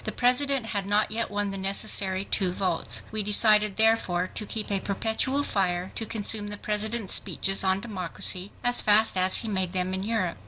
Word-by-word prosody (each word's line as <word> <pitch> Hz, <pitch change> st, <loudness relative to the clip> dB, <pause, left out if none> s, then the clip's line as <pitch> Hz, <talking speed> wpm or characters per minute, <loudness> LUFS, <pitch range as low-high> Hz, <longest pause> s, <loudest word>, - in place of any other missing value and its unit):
The -, -, -4 dB
President 255 Hz, +1 st, +1 dB
had 200 Hz, -3 st, -3 dB
not 210 Hz, +1 st, +1 dB
yet 230 Hz, +1 st, -2 dB
won 205 Hz, 0 st, -2 dB
the 195 Hz, 0 st, -6 dB
necessary 195 Hz, -1 st, +1 dB
2 185 Hz, -3 st, -1 dB
votes. 180 Hz, -3 st, -1 dB
We 215 Hz, 0 st, -3 dB
decided 210 Hz, 0 st, +3 dB
therefore 220 Hz, -5 st, +2 dB
to 210 Hz, -, -1 dB
keep 215 Hz, -1 st, -1 dB
a 200 Hz, -, 0 dB
perpetual 220 Hz, +8 st, -1 dB
fire 185 Hz, -5 st, -2 dB
to 225 Hz, -, -5 dB
consume 210 Hz, -1 st, -1 dB
the 205 Hz, 0 st, -6 dB
President's 215 Hz, 0 st, -2 dB
speeches 195 Hz, 0 st, 0 dB
on 190 Hz, 0 st, 0 dB
democracy 185 Hz, -2 st, -2 dB
as 245 Hz, 0 st, +5 dB
fast 215 Hz, 0 st, +4 dB
as 185 Hz, 0 st, +3 dB
he -, -, -2 dB
made 190 Hz, -4 st, -2 dB
them 185 Hz, 0 st, -1 dB
in 190 Hz, -, -1 dB
Europe. 205 Hz, -, -3 dB
205 Hz, 190 wpm, -25 LUFS, 190-220 Hz, -, as